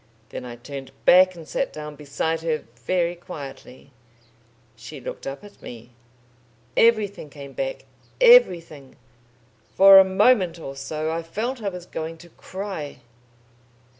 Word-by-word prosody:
Then - - -7
I 120 -1 -8
turned 135 +2 -9 0.2
back 185 +1 +6
and 165 -2 -11
sat - - -2
down 150 -1 -8
beside 150 +3 -3
her, 160 -2 -2
very 170 +8 -1
quietly. 140 -6 -11 0.8
She 125 +6 -10
looked - - -8
up 135 +7 -6
at 205 0 -15
me. 120 0 -11 0.8
Everything 210 -8 +2
came 140 -1 -11
back - - -4 0.3
everything. 170 - +4 0.8
For 195 0 +9
a - - +8
moment 190 -2 +3
or 135 -4 -8
so 155 +3 -4
I 165 +1 -2
felt 225 +10 -4
I 205 - -1
was 180 -2 -9
going 160 +1 -6
to 175 +1 -15
cry...." 185 -7 -7
165 Hz, 135 wpm, -23 LUFS, 140-190 Hz, 0.8 s, For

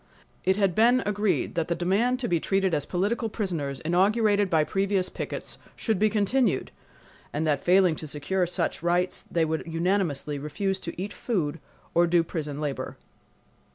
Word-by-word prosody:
It 190 +1 +2
had 195 -3 +2
been 240 +6 +4
agreed 205 0 0
that 165 -2 -1
the 170 - 0
demand 210 +9 +1
to 240 - -1
be 170 -5 +1
treated 195 +1 +1
as 145 - 0
political 215 +5 0
prisoners, 165 - -3
inaugurated 205 +4 +2
by 160 -3 +3
previous 195 +2 0
pickets, - - -5 0.2
should 220 -5 -1
be 215 +1 +4
continued, 210 - +1 0.6
and 155 +2 -1
that 145 -3 +1
failing 180 -2 +4
to 155 - -6
secure 175 +6 -1
such 175 - -2
rights 175 +2 +1
they 165 -1 0
would 160 0 -1
unanimously 165 -4 0
refuse 190 +7 -2
to 170 -1 -7
eat 200 +2 -4
food 165 -9 -2 0.3
or 170 +1 +4
do 170 0 +3
prison 150 -4 -4
labor. 145 -3 -4
180 Hz, 165 wpm, -26 LUFS, 160-205 Hz, 0.6 s, been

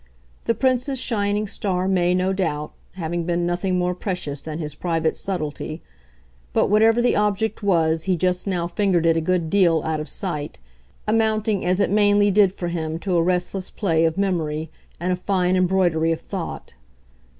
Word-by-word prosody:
The 230 - +1
Prince's 260 +1 +1
shining 205 -3 0
star 185 -2 -1
may, 180 -2 +2
no 185 +1 +1
doubt, 150 -6 -2 0.2
having 170 -1 -3
been 175 0 0
nothing 180 +1 0
more 180 0 0
precious 180 -7 -4
than 155 0 -6
his 150 -3 -4
private 165 0 -1
subtlety; 155 -3 -4 0.7
but - - +2
whatever 225 +3 +4
the 245 - +3
object 210 +2 0
was 165 -5 +1
he 185 -2 +1
just 180 +3 0
now 180 -3 0
fingered 180 -2 +1
it 165 -1 +4
a 165 - +1
good 170 -1 0
deal, 170 -6 +3
out 160 -1 -1
of 150 -1 -6
sight 150 -6 -4 0.5
amounting 215 -2 +1
as 180 +2 +1
it 200 - +2
mainly 205 0 +4
did 195 -1 +5
for 175 -2 -4
him 160 -2 -3
to 180 +1 -2
a 170 - +4
restless 180 +2 -1
play 165 -6 +1
of 160 +2 0
memory 160 -5 -1 0.3
and 180 +2 0
a - - +1
fine 185 0 0
embroidery 180 -3 +2
of 165 - -1
thought. - - -6
180 Hz, 175 wpm, -22 LUFS, 165-200 Hz, 0.7 s, did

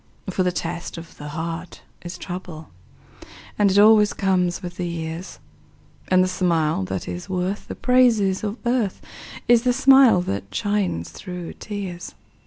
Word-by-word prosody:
For 185 - -1
the 180 -1 +2
test 170 -1 -5
of 165 0 -10
the 150 - -8
heart 165 +3 -6 0.2
is 175 0 -7
trouble, 175 -4 -8 0.9
And 205 -1 +5
it 190 - +1
always 210 0 +6
comes 185 -1 0
with 175 -1 -7
the 180 - -2
years, 165 +1 -5 0.7
And 185 0 +4
the - - +1
smile 165 - +1
that 95 0 -4
is 90 0 -6
worth 185 +2 -2
the - - -6
praises 230 -7 +3
of 210 +2 -3
earth 235 -5 0 0.5
Is 240 -1 +6
the 250 0 +2
smile 265 -6 +6
that 100 - -5
shines 200 - -1
through 180 -2 -7
tears. 190 -4 -7
180 Hz, 155 wpm, -22 LUFS, 170-205 Hz, 0.9 s, always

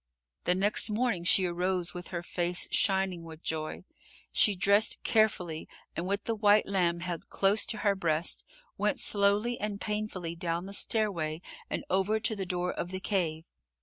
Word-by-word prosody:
The 180 - +3
next 205 +4 +2
morning 215 -4 0
she 185 +1 +6
arose 180 0 -1
with 180 0 -7
her 170 -1 -5
face 175 0 0
shining 190 -3 +1
with 160 -1 -11
joy. 155 +1 -4 0.5
She 210 - +4
dressed 200 +4 +2
carefully 180 -7 +1 0.3
and 175 - -3
with 200 +1 -1
the 230 - -1
white 210 -1 +4
lamb 175 -3 +1
held 175 -2 -5
close 200 +2 +3
to 220 - -2
her 200 - +4
breast, 170 -3 0 0.4
went - - +1
slowly 205 +4 +2
and 205 -1 -3
painfully 210 -6 -3
down 170 +1 -3
the 195 - -6
stairway 185 -9 +1 0.3
and - - -3
over 195 +4 +2
to 220 - 0
the 195 -2 -4
door 180 0 -1
of 175 - -4
the 185 0 -5
cave. 170 -5 -1
185 Hz, 170 wpm, -29 LUFS, 175-205 Hz, 0.5 s, she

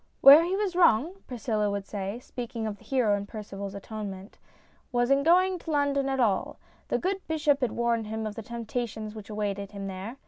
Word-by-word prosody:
"Where 285 +4 +10
he 360 +3 0
was 395 -3 -1
wrong," 345 - +3
Priscilla 220 -4 -1
would 200 -1 -3
say, 200 +1 -4
speaking 240 -3 -6
of 210 -1 -4
the - - -18
hero 245 -7 +2
of 200 - -8
Percival's 200 -2 -7
Atonement, 200 -1 -7 0.5
"was 245 +1 +1
in 275 0 +5
going 365 +4 +4
to 330 - -9
London 285 -2 +1
at 270 0 -1
all. 210 -6 +1 0.3
The - - +1
good 380 +2 -1
bishop 295 -3 +1
had 250 -4 0
warned 235 -2 0
him 220 0 -3
of 215 - -3
the 225 - -6
temptations 225 -1 -4
which 215 -1 -10
awaited 205 -1 -3
him 200 -1 -6
there. 195 +6 -6
230 Hz, 200 wpm, -28 LUFS, 210-280 Hz, 0.5 s, Where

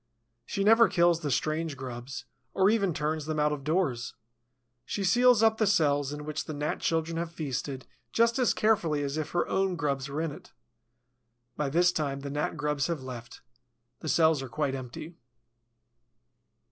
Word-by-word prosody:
She 200 - -1
never 225 +2 +6
kills 175 -3 +3
the 150 -3 -3
strange 155 +2 -1
grubs, 130 0 -7 0.3
or 190 +2 +4
even 200 -5 +2
turns 150 0 -2
them 155 -1 -1
out 150 0 +3
of 145 -2 -4
doors. 150 -7 -1 0.7
She 200 - -3
seals 240 +4 +5
up 220 0 +4
the 215 - +3
cells 145 -7 +2
in 150 0 -6
which 155 -1 -4
the 155 - -5
Gnat 150 +1 -2
children 165 0 -1
have 170 0 -3
feasted 140 -4 -4 0.3
just 230 +2 +2
as 250 - +3
carefully 170 -9 +2
as 140 0 -2
if 155 -1 -3
her 175 - 0
own 190 -1 0
grubs 140 -4 -2
were 140 +2 -3
in 165 -2 -2
it. - - -13 1.0
By 150 -2 -1
this 175 +5 +4
time 140 -5 -2
the 140 0 -5
Gnat 150 +2 -2
grubs 150 -2 0
have 165 -6 -3
left. 120 -2 -9 0.6
The 155 - -5
cells 160 -3 +4
are 135 - -6
quite 130 +4 -1
empty. 135 +6 -7
155 Hz, 175 wpm, -28 LUFS, 140-175 Hz, 1.0 s, never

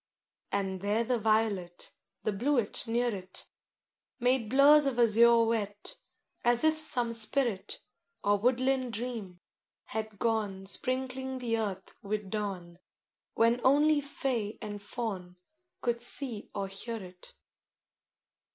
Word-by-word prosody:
II 200 - +1
And 190 -2 -4
there 205 +3 +1
the 245 +1 0
violet, 215 -5 0 0.3
The 215 - 0
bluet 240 +1 -1
near 240 +1 0
it, 185 -1 -11 0.7
Made 245 -2 +1
blurs 285 +3 +6
of 260 -3 -1
azure 235 0 +6
wet 210 -3 -3 0.5
As 240 +2 +2
if 315 0 +4
some 245 -7 +4
spirit, 230 -2 -1 0.4
Or 205 0 +3
woodland 255 +2 +1
dream, 220 -6 -6 0.4
had 220 -1 -5
gone 205 -4 -1
Sprinkling 260 +4 -1
the 240 -3 -1
earth 195 -3 -4
with 205 -1 -4
dawn, 185 -5 -4 0.6
When 230 +2 +3
only 295 +3 +4
Fay 255 -6 -2
and 205 -2 -7
Faun 200 -5 -5 0.5
Could 235 -1 -1
see 240 -3 -3
or 200 -1 -2
hear 210 +4 -5
it. 180 -3 -13
225 Hz, 125 wpm, -30 LUFS, 205-250 Hz, 0.7 s, blurs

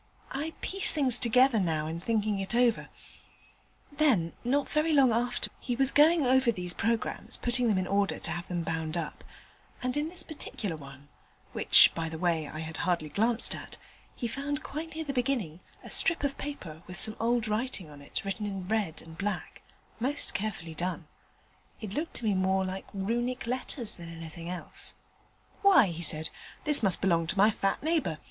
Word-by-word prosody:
I 305 +4 -4
piece 390 -2 +5
things 260 -5 +4
together 250 0 +4
now 160 -5 0
in 160 +2 -4
thinking 210 +1 -1
it 195 +4 -3
over. 240 -2 +2 1.0
Then, 265 - +2
not 275 +4 +1
very 310 +1 +1
long 265 -5 +5
after, 245 +2 -1
he 245 - -3
was 270 +2 +3
going 315 +2 +5
over 260 -1 +4
these 180 -4 -2
programmes, 230 +1 -1
putting 245 0 +1
them 210 -4 +2
in 185 - 0
order 200 +1 0
to 170 - -4
have 175 +1 -5
them 175 -2 -3
bound 160 0 -3
up, 165 -3 -5 0.6
and 255 0 -1
in 295 +2 -1
this 355 0 +4
particular 220 - -5
one 140 -1 -12 0.4
(which - - +7
by 165 -1 -3
the 160 - -6
way 165 -3 0
I 155 - -7
had 160 0 -6
hardly 170 -4 -1
glanced 225 +8 +1
at), - - -8 0.4
he 240 - -3
found 285 +4 -4
quite 315 +2 -6
near 320 - -3
the 285 -3 -4
beginning 240 - -1 0.2
a - - -10
strip 330 -2 +3
of 280 -1 -1
paper 185 - -7
with 180 -1 -8
some 215 - +5
very 235 +2 +1
odd 225 -2 -3
writing 215 -4 -2
on 145 -1 -13
it 140 - -5 0.2
in 195 -3 -4
red 205 -5 -1
and 160 0 -12
black 200 0 -4 0.4
most 270 +5 -1
carefully 195 -6 -4
done 175 +1 -4 0.7
it 215 -4 -7
looked 315 +6 -4
to - - -4
me 210 - +2
more 190 0 +1
like 190 +1 -5
Runic 235 +6 -2
letters 245 -1 0
than 170 -1 -9
anything 165 +1 -8
else. 180 -1 -1 0.7
"Why," 375 - +6
he 170 0 -6
said, 155 -1 +3 0.3
"this 295 -4 +4
must 195 -5 +2
belong 170 -4 +2
to 185 - -3
my 205 +3 +5
fat 195 +2 -1
neighbour. 310 - 0
215 Hz, 185 wpm, -29 LUFS, 170-260 Hz, 1.0 s, which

